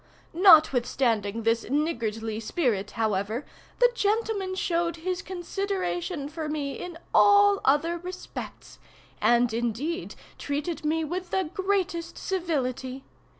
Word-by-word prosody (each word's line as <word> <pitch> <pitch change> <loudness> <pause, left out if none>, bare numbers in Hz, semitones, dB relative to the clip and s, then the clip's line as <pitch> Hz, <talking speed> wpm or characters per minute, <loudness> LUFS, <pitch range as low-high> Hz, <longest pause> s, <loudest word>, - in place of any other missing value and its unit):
Notwithstanding 245 - +4
this 230 +1 +2
niggardly 225 -7 -1
spirit, 220 - -1
however, 220 +3 -1 0.3
the - - +5
gentleman 415 -3 0
showed 340 -2 0
his 365 +3 -3
consideration 365 -4 -3
for 310 0 -5
me 290 -2 -2
in 355 -2 -7 0.2
all 405 0 +6
other 325 +5 +2
respects, 360 +1 -8 0.4
and 240 -1 +3
indeed 240 - -2 0.2
treated 295 +4 -3
me 320 +2 +1
with 355 +3 -4
the 375 -5 -1
greatest 380 -4 -1
civility. 270 -8 -2
320 Hz, 110 wpm, -27 LUFS, 245-365 Hz, 0.4 s, all